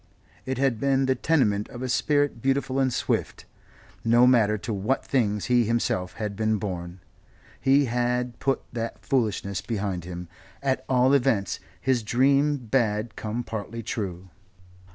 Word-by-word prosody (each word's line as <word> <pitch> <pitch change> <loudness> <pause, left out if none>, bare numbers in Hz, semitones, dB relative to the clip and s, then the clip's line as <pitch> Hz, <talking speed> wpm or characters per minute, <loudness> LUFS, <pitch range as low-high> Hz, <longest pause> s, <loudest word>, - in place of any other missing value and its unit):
It 130 -1 -1
had 130 -4 +1
been 135 0 +2
the 130 - +3
tenement 120 -8 +1
of 120 +1 -7
a - - -1
spirit 145 0 +1
beautiful 135 0 0
and 130 -1 +2
swift. - - -2 0.6
No 120 +2 +5
matter 110 -4 +4
to 110 +2 -4
what 105 +7 -1
things 105 -6 0
he 125 -1 +3
himself 105 -5 0
had 105 -2 -4
been 110 +1 +1
born 90 -3 -5 0.6
he 140 +1 +4
had 125 0 -1
put 135 -1 0
that 115 -1 -5
foolishness 100 -6 0
behind 100 -5 -3
him 90 0 -7 0.4
at 135 -1 0
all 130 +1 +4
events 120 -8 +1 0.2
his 130 -2 +1
dream 135 +3 +2
had 110 -3 +1
come 110 +3 -3
partly 115 +1 -5
true. 95 -5 -4
120 Hz, 150 wpm, -26 LUFS, 105-130 Hz, 0.6 s, No